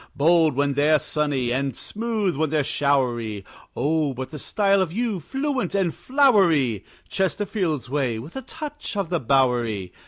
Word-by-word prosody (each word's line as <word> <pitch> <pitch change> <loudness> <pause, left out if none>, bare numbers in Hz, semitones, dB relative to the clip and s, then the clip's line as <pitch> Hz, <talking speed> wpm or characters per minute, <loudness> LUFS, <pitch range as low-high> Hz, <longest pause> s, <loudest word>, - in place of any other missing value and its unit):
Bold 160 0 +4
when 140 0 +1
they're 150 +3 +4
sunny, 145 -5 -1
and 135 -1 -2
smooth 215 -5 -2
when 155 +2 0
they're 150 -1 +1
showery 120 -8 0 0.3
Oh, 150 0 0
but 130 +1 -6
the 150 - -7
style 200 +2 +2
of 180 -4 -1
you, 220 0 -1
fluent 265 - -2
and 185 -5 +1
flowery! 180 - +3 0.2
Chesterfield's 185 - -1
way, 130 -4 -1
with 135 +9 -9
a 265 - -4
touch 295 -6 -7
of 195 -5 -1
the 175 - +1
Bowery! 120 -7 +1
155 Hz, 155 wpm, -23 LUFS, 130-195 Hz, 0.3 s, Bold